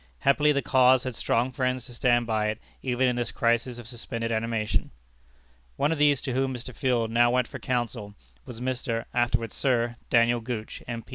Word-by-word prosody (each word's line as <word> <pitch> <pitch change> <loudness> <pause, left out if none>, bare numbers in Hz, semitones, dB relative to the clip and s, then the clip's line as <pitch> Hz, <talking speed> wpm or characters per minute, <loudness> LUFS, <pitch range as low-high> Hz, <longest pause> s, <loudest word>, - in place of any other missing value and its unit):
Happily, 150 +2 +4
the 140 -1 0
cause 130 -1 +4
had 130 -2 -4
strong 120 +3 0
friends 130 -1 -1
to 125 - -10
stand 120 0 +2
by 110 -2 0
it 105 +1 -2 0.2
even 130 0 +1
in 125 -1 0
this 120 - -2
crisis 120 +1 0
of 120 -2 -9
suspended 115 -1 -4
animation. 110 -1 -1 0.9
One 145 +2 +1
of 165 - -1
these 145 -2 +4
to 130 - -3
whom 130 0 0
Mr. 125 +1 -8
Field 120 -4 0
now 120 +1 +4
went 125 0 +1
for - - -8
counsel, 120 -5 -3 0.3
was 115 - -9
Mr. 125 -2 -2
(afterward 120 -2 0
Sir) 120 -3 0
Daniel 120 0 +4
Gooch, 115 -2 -5
M. 115 -1 -5
120 Hz, 190 wpm, -26 LUFS, 115-130 Hz, 0.9 s, Happily